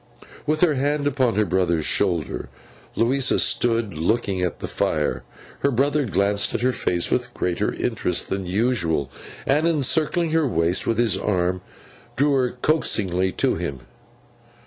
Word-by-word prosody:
With 155 +1 0
her 175 -4 +4
hand 145 +2 0
upon 130 -5 +1
her 105 0 +2
brother's 90 -4 0
shoulder, 85 -10 0 0.5
Louisa 130 +3 +2
still 120 -1 +2
stood 105 -5 -10
looking 95 +3 -1
at 90 -2 -2
the - - -6
fire. - - -1 0.4
Her 140 - +1
brother 140 +2 +1
glanced 100 0 +1
at - - -1
her 130 +1 +2
face 90 -7 0
with 125 -1 -1
greater 90 -1 -1
interest - - -1
than 95 -1 -3
usual, 90 - 0 0.3
and, 150 +4 +2
encircling 160 +2 +1
her 160 -2 +2
waist 85 -4 0
with 115 - +1
his 115 -5 +2
arm, 90 -2 0 0.5
drew 145 +2 +2
her 130 -2 +2
coaxingly 95 - +1
to - - +1
him. 65 -3 -5
115 Hz, 150 wpm, -22 LUFS, 90-140 Hz, 0.5 s, her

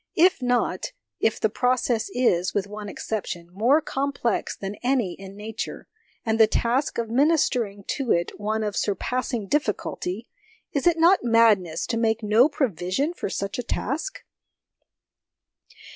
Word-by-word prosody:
If 360 -2 +5
not 245 - 0 0.3
if 225 - +1
the - - +3
process 245 - 0
is, 180 -8 +2
with 200 -2 +1
one 210 0 -7
exception, 185 -6 -4
more 245 +10 +3
complex 275 -5 -2
than 200 +1 -5
any 245 -7 +1
in 195 +1 -11
Nature, 220 +1 -6 0.4
and 225 0 +1
the 220 - +8
task 245 +6 0
of 230 -1 -2
ministering 245 -7 +2
to 265 -4 -1
it 170 +3 0
one 215 +1 -1
of 210 -1 -2
surpassing 235 +3 -1
difficulty 215 -5 -2 0.4
is 280 +2 0
it 340 -1 +4
not 345 +4 +5
madness 215 -8 +3
to 230 - -2
make 225 -1 +1
no 220 +7 +5
provision 265 - -1
for 345 - -4
such 200 +4 -3
a - - -2
task 310 - -3
230 Hz, 145 wpm, -25 LUFS, 205-265 Hz, 0.4 s, the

